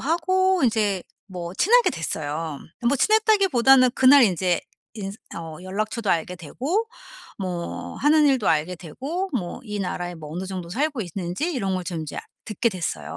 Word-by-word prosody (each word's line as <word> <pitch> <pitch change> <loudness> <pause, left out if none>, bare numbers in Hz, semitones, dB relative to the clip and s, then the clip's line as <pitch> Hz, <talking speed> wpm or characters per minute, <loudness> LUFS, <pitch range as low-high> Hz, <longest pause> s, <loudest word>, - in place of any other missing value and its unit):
하고 370 +4 +2
인제 210 -5 +1 0.2
뭐 175 -3 -6
친하게 475 - +4
됐어요. 155 -1 -3 0.3
뭐 280 - +2
친했다기보다는 335 - +4
그날 265 +2 +7
인제 180 -3 +1 0.3
인스 200 -1 -6 0.2
어 165 -2 -7
연락처도 215 +3 -3
알게 175 +2 0
되고 275 - -2 0.5
뭐 180 -3 -5
하는 300 +1 +4
일도 260 -6 +2
알게 160 +4 +1
되고 280 - -4
뭐 185 -10 -3
이 210 -2 -4
나라에 175 -1 -3
뭐 155 -3 -10
어느 180 +3 -4
정도 185 -3 -6
살고 280 - -1
있는지 185 - -3
이런 195 - -1
걸 185 - -2
좀 170 -3 -4
인제 155 -2 -6
아 - - -2 0.2
듣게 225 +2 0
됐어요. 170 - -4
200 Hz, 320 characters per minute, -24 LUFS, 175-280 Hz, 0.5 s, 그날